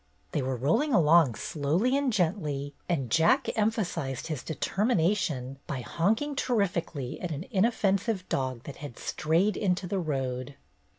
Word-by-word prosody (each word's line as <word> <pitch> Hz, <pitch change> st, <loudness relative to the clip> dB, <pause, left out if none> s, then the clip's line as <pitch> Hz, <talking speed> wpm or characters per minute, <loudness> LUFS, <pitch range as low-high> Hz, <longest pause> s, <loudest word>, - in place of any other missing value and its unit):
They -, -, 0 dB
were 130 Hz, 0 st, -1 dB
rolling 225 Hz, -, +2 dB
along 160 Hz, -, +5 dB
slowly 165 Hz, -, 0 dB
and 280 Hz, -2 st, +1 dB
gently, 155 Hz, -8 st, -1 dB, 0.2 s
and 135 Hz, -9 st, -1 dB
Jack 170 Hz, -, +4 dB
emphasized 185 Hz, -, -1 dB
his 155 Hz, -6 st, -3 dB
determination 160 Hz, -, 0 dB
by 135 Hz, -3 st, -3 dB
honking 220 Hz, -, 0 dB
terrifically 175 Hz, -, -1 dB
at 180 Hz, -, -3 dB
an 155 Hz, +2 st, -4 dB
inoffensive 200 Hz, -1 st, +1 dB
dog 130 Hz, -3 st, -2 dB
that 140 Hz, -, -8 dB
had 145 Hz, -5 st, -8 dB
strayed 170 Hz, +7 st, +1 dB
into 185 Hz, -2 st, 0 dB
the 190 Hz, +2 st, -1 dB
road. 135 Hz, -4 st, -3 dB
170 Hz, 135 wpm, -28 LUFS, 140-205 Hz, 0.2 s, along